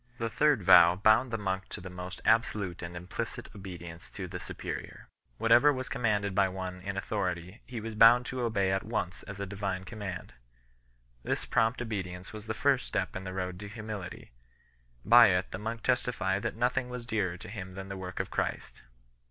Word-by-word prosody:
The 115 -1 -2
third 145 -2 +3
vow 85 0 +8
bound 110 +6 +4
the 115 - -1
monk 95 -2 -3
to - - -6
the 90 - -8
most 90 0 -7
absolute 105 -5 +2
and 85 0 -6
implicit 90 +1 -5
obedience 85 -3 -9
to 95 -2 -6
the 90 0 -6
superior. - - -6 0.3
Whatever 120 - +6
was 130 -2 -4
commanded 105 -5 0
by 95 0 +3
one 90 -1 -5
in 100 +1 -4
authority 95 0 -3
he 120 -2 -5
was 110 +1 -5
bound 115 +3 +7
to 130 0 -4
obey 100 -5 +1
at 95 0 +1
once 100 -5 -3
as 100 0 -9
a 100 - -2
Divine 95 -1 -3
command. 100 -4 -6 0.9
This - - -1
prompt 115 +2 +1
obedience 95 -5 -5
was 110 0 -8
the 110 - -2
first 140 -1 +2
step - - -2
in 95 +1 -5
the 95 - -5
road 90 0 -4
of 105 0 -8
humility; 105 - -7 0.7
by 120 +1 +9
it 90 -1 +1
the - - -5
monk 115 +2 -4
testified 120 -6 +1
that 120 - -2
nothing 125 +2 0
was 125 -1 -6
dearer 100 -6 -1
to - - -10
him 95 -2 -7
than 95 0 -6
the 100 - -5
work 95 -1 -6
of - - -3
Christ. - - -3
100 Hz, 195 wpm, -30 LUFS, 95-115 Hz, 0.9 s, by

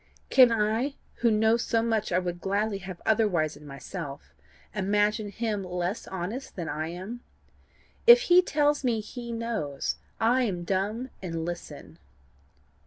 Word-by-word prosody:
Can 255 -3 +7
I, 225 +5 +1 0.2
who 235 - +3
know 220 +1 +3
so 230 -1 0
much 225 -2 0
I 175 - +3
would 175 -1 -2
gladly 200 +2 0
have 190 -2 -8
otherwise 190 -9 +2
in 145 0 -13
myself, 140 - -8 0.4
imagine 210 +1 +1
him 210 -1 -2
less 180 +3 -3
honest 190 +9 -5
than 170 -3 -4
I 155 0 -3
am? 190 +8 -7 0.9
If 475 +1 +10
he 360 -5 +6
tells 295 -4 +1
me 235 -3 +1
he 235 +2 -7
knows, 225 -12 -2 0.2
I 240 +3 +3
am 190 -8 -1
dumb 205 +8 -2
and 165 -3 -3
listen. 175 0 -7
210 Hz, 145 wpm, -27 LUFS, 180-230 Hz, 0.9 s, If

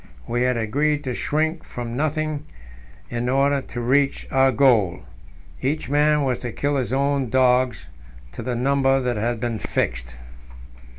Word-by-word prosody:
We 120 +1 -1
had 125 -1 +2
agreed 145 +7 0
to 130 -3 -3
shrink 155 +6 -1
from 120 -1 -6
nothing 155 +1 -2 0.6
in 120 +1 -2
order 140 +1 +2
to 125 - -7
reach 135 +3 +1
our 135 0 +4
goal. 110 -9 +3 0.6
Each 145 +1 -2
man 150 +1 +3
was 130 -3 0
to 120 - -5
kill 145 +5 -1
his 130 -2 -2
own 140 -1 +1
dogs 125 - +2 0.4
to - - -7
the 125 -1 -3
number 135 +2 +2
that 125 -3 -1
had 115 +2 -1
been 115 -1 -2
fixed. - - -2
130 Hz, 155 wpm, -22 LUFS, 120-140 Hz, 0.6 s, our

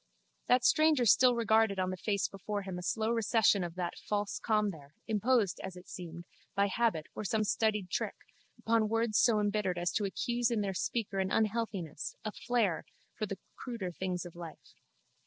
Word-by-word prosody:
The 250 - +6
stranger 310 -2 +4
still 250 +3 +6
regarded 220 -3 +3
on 185 0 0
the - - -3
face 200 +2 0
before 200 +1 -4
him 190 -2 -5
a - - -6
slow 220 +5 0
recession 220 -3 +3
of 170 -1 -5
that 175 -1 -3
false 205 -1 -2
calm 210 -2 +1
there, 150 -3 -14
imposed, 220 -2 +2
as 190 -1 -6
it 180 0 -12
seemed, 170 -1 -8 0.3
by 200 0 +3
habit 215 -8 +1
or - - -5
some 215 +1 +1
studied 210 -3 0
trick, - - -1 0.4
upon 225 -1 +1
words 225 -1 +2
so 225 -3 +4
embittered 205 -3 0
as 175 0 0
to 210 - 0
accuse 240 +4 0
in 230 -3 0
their 195 -1 -1
speaker 195 +1 -2
an 190 0 0
unhealthiness, 210 -8 -1
a 215 - -1
flair, 225 -8 0 0.3
for 215 - -3
the 195 - -5 0.2
cruder 230 -8 -5
things 180 0 -3
of 175 - -10
life. 170 -2 -10
205 Hz, 185 wpm, -32 LUFS, 185-225 Hz, 0.4 s, The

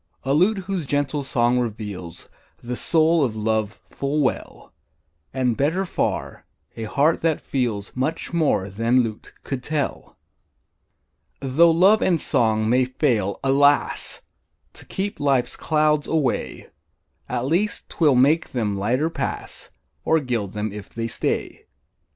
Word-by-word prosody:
A 135 - 0
lute 185 +8 +3
whose 185 -6 -3
gentle 145 +1 0
song 125 -2 +1
reveals 105 -7 -5 0.4
The 125 +1 -4
soul 160 +3 +3
of 115 -5 -1
love 110 -1 -1
full 140 +2 -2
well; 130 - -3 0.6
And, 125 -3 0
better 165 +9 0
far, - - -3 0.3
a 115 - -5
heart 145 +8 +2
that 160 -2 +1
feels 115 -7 -3
Much 150 +7 -2
more 150 - +1
than 115 +6 +2
lute 110 -2 -6
could 135 -2 -4
tell. 150 +1 -3 1.2
Tho' 140 +6 +4
love 190 +6 +5
and 175 -3 +2
song 110 -5 +1
may 125 +3 +3
fail, 120 -7 0
alas! 140 +1 +2 0.5
To - - -11
keep 200 +1 -3
life's 135 -4 +1
clouds 150 -1 +1
away, 150 -6 -1 0.6
At 125 0 -2
least 180 +9 0
'twill 150 -5 +2
make 145 +6 +3
them 110 -5 -1
lighter 125 +11 0
pass, - - -4 0.3
Or 160 - +3
gild 120 -8 -3
them 105 0 -3
if 105 -1 -8
they 115 0 -4
stay. 115 - -3
135 Hz, 135 wpm, -23 LUFS, 115-155 Hz, 1.2 s, love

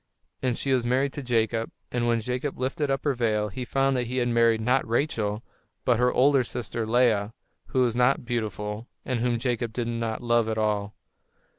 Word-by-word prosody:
And 125 -2 0
she 135 - 0
was 125 -2 +2
married 130 +3 +1
to 145 - -5
Jacob, 115 -2 0 0.2
and 120 -1 0
when 115 -1 +2
Jacob 125 +4 -3
lifted 135 +3 -1
up 135 -1 0
her 145 - +2
veil 110 -4 0
he 125 +6 -5
found 135 +2 +1
that 125 -2 -1
he 125 +2 -3
had 120 -1 +1
married, 115 -1 +3
not 125 +4 +1
Rachel, 115 -3 -1 0.4
but 120 -3 +3
her 125 0 +3
older 135 0 +4
sister, 115 -2 -4
Leah, 115 -3 +2 0.3
who 130 - +1
was 120 -2 +2
not 125 +1 +2
beautiful, 110 -1 -3 0.2
and 125 -2 -1
whom 120 0 +1
Jacob 120 -1 -1
did 120 0 -2
not 115 0 -3
love 120 -1 +2
at 110 - -2
all. 105 -1 -1
120 Hz, 195 wpm, -26 LUFS, 115-125 Hz, 0.4 s, older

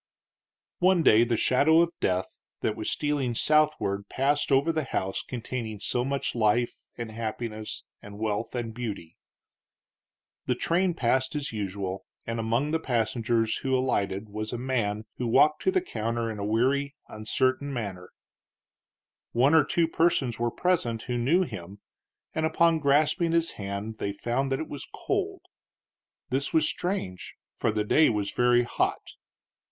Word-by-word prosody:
One 185 -2 +4
day 110 -3 +6
the 120 -1 0
shadow 155 +8 +4
of 170 0 +1
death 90 0 -1 0.2
that 105 - 0
was 110 - -2
stealing 145 -5 0
southward 150 -9 +1
passed 145 +2 +1
over 140 +5 +4
the 155 -3 -1
house 95 -6 -2
containing 115 -3 -5
so 120 +4 0
much 140 +1 -2
life, 120 +1 +2 0.2
and 115 -2 -5
happiness, 110 -1 -5 0.2
and 100 0 -10
wealth, 110 +2 -2
and 115 -2 -3
beauty. 105 -9 -6 1.3
The 125 - +2
train 175 +6 +1
passed 130 +1 +1
as 145 -1 -2
usual, 95 -2 -4 0.2
and 115 0 -3
among 115 +7 0
the 160 - +1
passengers 115 -3 0
who 130 -1 0
alighted 100 -5 -1
was 110 +1 -4
a 120 - -3
man 115 -4 -1
who 125 - -2
walked 145 +6 +4
to 375 - +4
the 375 -1 +2
counter 115 - -2
in 105 - -6
a - - -3
weary, 135 +6 +1
uncertain 130 +6 -1
manner. 100 -8 -5 1.2
One 130 +6 +4
or 160 -2 +7
two 170 +3 +1
persons 160 -8 +1
were 120 0 +1
present 120 -8 0
who 125 - -3
knew 140 +10 +3
him, 100 - -8 0.5
and 160 - -1
upon 165 +1 +3
grasping 155 +4 +2
his 170 0 +2
hand 100 +2 -5
they 100 - -2
found 120 +6 -1
that 135 - 0
it 160 - -4
was 145 - -7
cold. - - -2 0.9
This 135 +2 -1
was 155 -1 +4
strange, 175 - -3 0.2
for 115 - 0
the 105 0 0
day 155 +9 +4
was 105 -3 -1
very 120 0 +3
hot. 120 - -2
120 Hz, 155 wpm, -27 LUFS, 110-145 Hz, 1.3 s, or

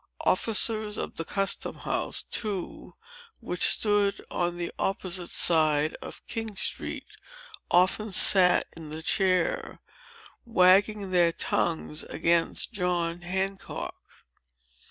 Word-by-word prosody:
Officers 215 -1 +1
of - - -6
the 165 - -1
custom 195 +4 -1
house, - - -3
too, 205 -5 -4 0.4
which 180 -6 -6
stood 205 -2 +3
on 175 0 -2
the 175 -1 -4
opposite 185 -2 -2
side 155 -2 +3
of - - -9
King 225 -3 -5
Street, - - -2 0.6
often 185 +4 +2
sat 185 -1 +4
in 160 -2 -10
the 155 +1 -6
chair, 185 -2 0 0.6
wagging 200 -1 +3
their 175 -2 +4
tongues 160 -2 -2
against 170 +5 +1
John 175 -3 -1
Hancock." 190 +2 -5
185 Hz, 105 wpm, -27 LUFS, 170-205 Hz, 0.6 s, sat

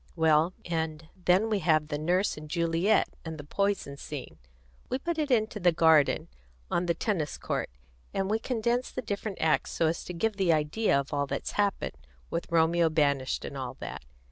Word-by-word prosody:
Well, 160 +1 +3
and 160 -2 -3 0.2
then 185 +5 +4
we 215 -2 +1
have 155 -3 +2
the 150 -1 -2
Nurse 180 +6 +1
and 150 0 -10
Juliet, 170 +5 +2 0.2
and 160 -1 -6
the 145 - -7
poison 195 -3 -1
scene 140 -2 -7 0.5
we 255 - 0
put 335 +4 -3
it 300 -2 0
into 220 -4 +1
the 175 -2 +4
garden, 160 -3 +4 0.4
on 175 +1 +1
the 170 - +2
tennis 175 -10 -1
court, - - -2 0.4
and 195 -1 -1
we 215 +2 +1
condense 240 +1 0
the 255 - -5
different 205 -1 -4
acts 160 -1 +2
so 165 - 0
as 160 +1 0
to 180 - -5
give 210 +3 -1
an 180 -3 +4
idea 155 +3 +2
of 140 +2 -5
all 140 -1 0
that's - - -3
happened, 205 -1 0 0.4
with 170 +1 -3
Romeo 165 0 +4
banished, 140 -4 +1
and - - -6
all 130 -1 -5
that. - - -7
170 Hz, 190 wpm, -29 LUFS, 155-205 Hz, 0.5 s, then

